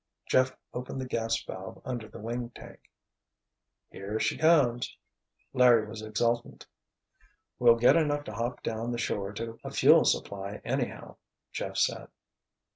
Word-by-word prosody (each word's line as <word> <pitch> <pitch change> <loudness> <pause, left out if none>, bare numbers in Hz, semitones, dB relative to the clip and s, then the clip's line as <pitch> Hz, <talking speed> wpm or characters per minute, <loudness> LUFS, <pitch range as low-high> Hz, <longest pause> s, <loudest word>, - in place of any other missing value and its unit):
Jeff 130 0 +2 0.2
opened 125 +2 -5
the 130 - -3
gas 115 -2 -1
valve 95 0 -8
under 120 -4 -4
the - - -12
wing 120 +2 -4
tank. - - -13 1.0
"Here 100 +3 -4
she 110 0 +1
comes!" 145 -7 +3 0.6
Larry 120 -3 +5
was 110 0 -8
exultant. 115 +2 -1 0.9
"We'll 120 -1 +7
get 120 +1 +5
enough 145 -3 +1
to 110 - -8
hop 120 +3 -3
down 115 +1 -3
the 120 - -2
shore 100 -3 -2
to 115 +1 -6
a - - -5
fuel - - +6
supply, 100 +1 -1
anyhow," - - -3 0.3
Jeff - - -4
said. - - 0
115 Hz, 140 wpm, -29 LUFS, 110-125 Hz, 1.0 s, We'll